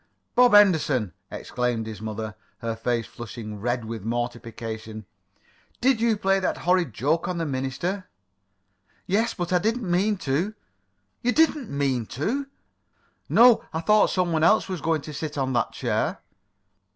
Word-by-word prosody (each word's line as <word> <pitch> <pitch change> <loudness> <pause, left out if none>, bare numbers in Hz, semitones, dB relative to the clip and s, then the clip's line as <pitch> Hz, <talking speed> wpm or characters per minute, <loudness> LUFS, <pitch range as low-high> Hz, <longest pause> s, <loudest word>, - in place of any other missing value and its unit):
"Bob 245 -3 +6
Henderson!" 150 - +4 0.2
exclaimed 120 -2 -2
his 110 -1 -7
mother, 110 0 -4 0.2
her 115 -1 -3
face 115 0 -1
flushing 110 -1 -8
red 120 +2 -1
with 110 -2 -6
mortification. 115 -2 -5 0.7
"Did 250 -2 +2
you 230 -2 +3
play 195 -1 +2
that 190 - -1
horrid 180 -5 +3
joke 145 - 0
on 180 - -2
the 165 - -1
minister?" 145 +8 -3 1.0
"Yes, 220 +5 +1
but 175 0 -3
I 180 - +4
didn't 225 +2 -1
mean 195 +4 +2
to." 175 +8 -1 0.7
"You 245 - +2
didn't 305 -6 +2
mean 135 -5 -1
to?" 265 - -1 0.8
"No. 240 0 +6
I 160 - -1
thought 210 +4 +4
some 180 -2 0
one 160 -1 +1
else 215 +6 +4
was 185 -5 -4
going 160 -1 +1
to 150 - -8
sit 150 +1 -5
on 130 -1 0
that 120 - +1
chair." - - -1
155 Hz, 150 wpm, -25 LUFS, 120-195 Hz, 1.0 s, Bob